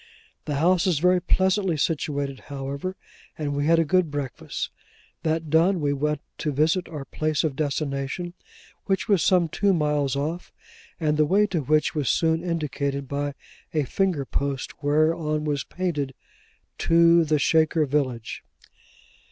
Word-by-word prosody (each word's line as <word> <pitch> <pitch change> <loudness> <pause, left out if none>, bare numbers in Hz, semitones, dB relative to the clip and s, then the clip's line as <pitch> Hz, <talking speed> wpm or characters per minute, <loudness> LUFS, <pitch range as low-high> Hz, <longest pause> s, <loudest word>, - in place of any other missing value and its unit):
The 145 - -2
house 175 +5 +3
is 175 -5 +2
very 180 +3 +3
pleasantly 190 -1 +1
situated, 145 -3 -1
however, 140 +6 -4 0.4
and 145 -2 -2
we 145 +1 0
had 165 +1 +5
a 165 - +3
good 180 +1 +2
breakfast. 145 -4 -4 0.5
That 160 -1 -1
done, 170 +4 +4
we 145 -2 +1
went 150 +1 -1 0.2
to 150 - -1
visit 160 +6 +1
our 150 -4 -6
place 155 +1 -1
of 155 -4 -1
destination, 145 +3 -2 0.5
which 195 -2 0
was 200 -5 +3
some 180 -3 +3
two 195 +4 +1
miles 150 -3 +1
off, 155 +5 -3 0.5
and 155 -2 +1
the 155 - +4
way 200 +7 +4
to 185 -6 -1
which 155 +2 +2
was 145 -5 -1
soon 165 0 +2
indicated 140 -5 -2
by 145 +1 -3 0.4
a 150 - +3
finger 165 0 0
post, 140 0 -3
whereon 155 +1 +1
was 145 -2 -1
painted, 150 -8 -3 0.6
'To 170 0 +5
the 155 -1 +2
Shaker 160 +1 +3
Village. 130 -5 -2
155 Hz, 150 wpm, -25 LUFS, 145-170 Hz, 0.6 s, had